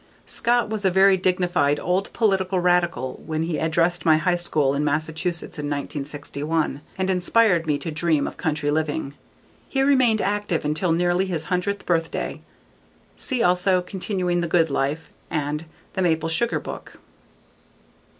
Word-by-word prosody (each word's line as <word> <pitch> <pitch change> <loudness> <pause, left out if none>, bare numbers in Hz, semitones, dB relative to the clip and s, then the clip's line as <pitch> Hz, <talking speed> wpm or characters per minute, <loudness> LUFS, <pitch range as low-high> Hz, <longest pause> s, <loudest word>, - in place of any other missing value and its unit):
Scott 240 0 +1
was 215 -1 -4
a 190 - +4
very 190 +1 +5
dignified 180 -6 +1
old 185 +2 -1
political 195 -4 +1
radical 175 -8 +1
when 155 0 -2
he 165 -1 -2
addressed 170 +2 +1
my 160 -2 +5
high 180 +3 +1
school 150 -5 0
in 140 +1 0
Massachusetts 160 +3 -2
in 150 - -3
1961 145 +1 -3 0.2
and 190 0 -1
inspired 180 -2 +3
me 150 -2 +2
to 165 - -5
dream 155 -1 +1
of - - -5
country 150 -2 -1
living. 150 -2 -1 0.6
He 270 -1 +1
remained 255 -5 +4
active 205 -6 -1
until 155 +4 0
nearly 175 +3 +1
his 165 -4 -2
hundredth 200 +3 -1
birthday. 165 -2 -1 0.7
See 255 -3 -1
also: 180 +1 +3
Continuing 180 -1 -2
the 170 - -1
Good 165 -2 +2
Life 140 +4 -2 0.2
and 150 0 -2 0.3
_The 190 - -2
Maple 165 -2 +1
Sugar 230 +9 0
Book. - - -9
175 Hz, 150 wpm, -23 LUFS, 155-190 Hz, 0.7 s, very